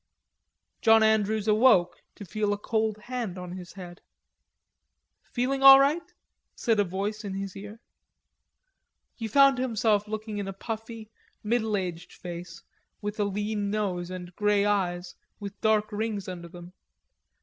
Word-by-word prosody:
John 225 Hz, 0 st, +6 dB
Andrews 220 Hz, -1 st, +2 dB
awoke 215 Hz, -5 st, +4 dB
to 205 Hz, -, -9 dB
feel 210 Hz, +2 st, -1 dB
a -, -, -3 dB
cold 220 Hz, 0 st, -1 dB
hand 235 Hz, -6 st, -4 dB
on 180 Hz, -1 st, -7 dB
his 180 Hz, -1 st, -9 dB
head. 180 Hz, -2 st, -10 dB, 1.3 s
"Feeling 265 Hz, +2 st, -1 dB
all 270 Hz, 0 st, +11 dB
right?" 290 Hz, +5 st, +3 dB, 0.5 s
said 225 Hz, -3 st, +1 dB
a -, -, +5 dB
voice 200 Hz, +4 st, -4 dB
in 195 Hz, -2 st, -5 dB
his 195 Hz, -1 st, -5 dB
ear. 210 Hz, +3 st, -9 dB, 1.3 s
He 225 Hz, -, -5 dB
found 275 Hz, +2 st, +5 dB
himself 220 Hz, -4 st, +1 dB
looking 215 Hz, 0 st, -5 dB
in 200 Hz, -, -4 dB
a 195 Hz, -, -4 dB
puffy, 225 Hz, +1 st, -7 dB, 0.3 s
middle 220 Hz, -1 st, 0 dB
aged 180 Hz, -3 st, -5 dB
face, 175 Hz, -1 st, -9 dB, 0.4 s
with 210 Hz, 0 st, -5 dB
a 205 Hz, -, +2 dB
lean 205 Hz, +1 st, -2 dB
nose 190 Hz, -4 st, -2 dB
and 180 Hz, -1 st, -8 dB
grey 210 Hz, -1 st, +2 dB
eyes, 180 Hz, -3 st, -1 dB, 0.3 s
with 200 Hz, -1 st, -8 dB
dark 215 Hz, 0 st, +2 dB
rings 210 Hz, -2 st, -3 dB
under 175 Hz, -2 st, -7 dB
them. 175 Hz, +1 st, -12 dB
210 Hz, 145 wpm, -27 LUFS, 190-220 Hz, 1.3 s, all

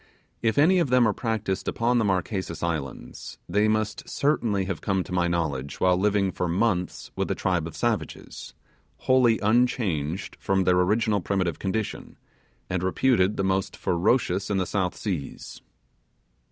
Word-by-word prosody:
If 115 Hz, +2 st, +1 dB
any 175 Hz, +6 st, +5 dB
of 165 Hz, -, +1 dB
them 125 Hz, -2 st, +4 dB
are 105 Hz, -, +1 dB
practised 110 Hz, -5 st, -2 dB
upon 120 Hz, +1 st, +1 dB
the -, -, +2 dB
Marquesas 95 Hz, -3 st, -2 dB
Islands 75 Hz, -8 st, -5 dB
they 105 Hz, +4 st, +2 dB
must 110 Hz, 0 st, -1 dB
certainly 115 Hz, -9 st, +1 dB
have 95 Hz, -3 st, -4 dB
come 95 Hz, -2 st, 0 dB
to -, -, -12 dB
my 90 Hz, -1 st, +1 dB
knowledge 75 Hz, -6 st, -2 dB
while 90 Hz, -1 st, +4 dB
living 100 Hz, 0 st, +1 dB
for 90 Hz, -, -2 dB
months 90 Hz, 0 st, -1 dB
with -, -, -2 dB
a -, -, 0 dB
tribe 90 Hz, -4 st, 0 dB
of 80 Hz, -, -9 dB
savages, 115 Hz, +6 st, -3 dB, 0.5 s
wholly 125 Hz, -3 st, +4 dB
unchanged 100 Hz, -, 0 dB
from 95 Hz, -1 st, +1 dB
their 90 Hz, 0 st, +3 dB
original 105 Hz, +2 st, +2 dB
primitive 90 Hz, -3 st, -1 dB
condition, 100 Hz, +2 st, -4 dB, 0.5 s
and 90 Hz, -1 st, -2 dB
reputed 95 Hz, +1 st, +2 dB
the 95 Hz, -, 0 dB
most 95 Hz, 0 st, -1 dB
ferocious 95 Hz, +1 st, +1 dB
in 100 Hz, -, +1 dB
the 95 Hz, -, +1 dB
South 90 Hz, -1 st, -1 dB
Seas. 90 Hz, -10 st, -5 dB
95 Hz, 155 wpm, -25 LUFS, 90-110 Hz, 0.5 s, any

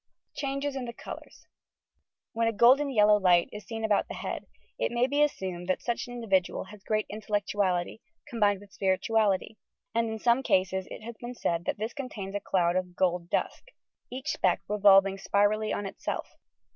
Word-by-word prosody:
CHANGES 275 Hz, 0 st, -2 dB
IN 260 Hz, -2 st, -3 dB
THE 235 Hz, -, -6 dB
COLOURS -, -, -10 dB, 0.9 s
"When 230 Hz, 0 st, +1 dB
a -, -, +2 dB
golden 260 Hz, +7 st, +5 dB
yellow 210 Hz, -4 st, +5 dB
light 175 Hz, -3 st, +4 dB
is 210 Hz, -2 st, -9 dB
seen 225 Hz, -1 st, -3 dB
about 210 Hz, -2 st, +2 dB
the -, -, -7 dB
head, -, -, -5 dB, 0.3 s
it -, -, 0 dB
may 240 Hz, +1 st, +2 dB
be 285 Hz, +3 st, +1 dB
assumed 185 Hz, -11 st, -1 dB
that 185 Hz, -, -1 dB
such 235 Hz, 0 st, -2 dB
an 245 Hz, -, -8 dB
individual 195 Hz, -6 st, 0 dB
has 205 Hz, +1 st, -13 dB
great 215 Hz, +1 st, 0 dB
intellectuality, 205 Hz, -3 st, -1 dB, 0.3 s
combined 205 Hz, -4 st, +1 dB
with 200 Hz, -1 st, -16 dB
spirituality; 205 Hz, +2 st, +1 dB, 0.3 s
and 230 Hz, 0 st, +1 dB
in 220 Hz, -, -3 dB
some 235 Hz, +3 st, +3 dB
eases 190 Hz, 0 st, +2 dB
it -, -, -9 dB
has 235 Hz, 0 st, -8 dB
been 245 Hz, +1 st, -7 dB
said 170 Hz, -6 st, -1 dB
that -, -, -1 dB
this 220 Hz, +3 st, -4 dB
contains 215 Hz, -9 st, -6 dB
a 205 Hz, -, -1 dB
cloud 175 Hz, -3 st, +1 dB
of 180 Hz, -1 st, -2 dB
"gold 180 Hz, -2 st, 0 dB
dust," -, -, -2 dB, 0.4 s
each 265 Hz, +5 st, -4 dB
speck 185 Hz, -, +1 dB
revolving 195 Hz, -1 st, +5 dB
spirally 205 Hz, +2 st, +1 dB
on 205 Hz, -, -2 dB
itself. 195 Hz, -, -4 dB
210 Hz, 180 wpm, -28 LUFS, 190-235 Hz, 0.9 s, golden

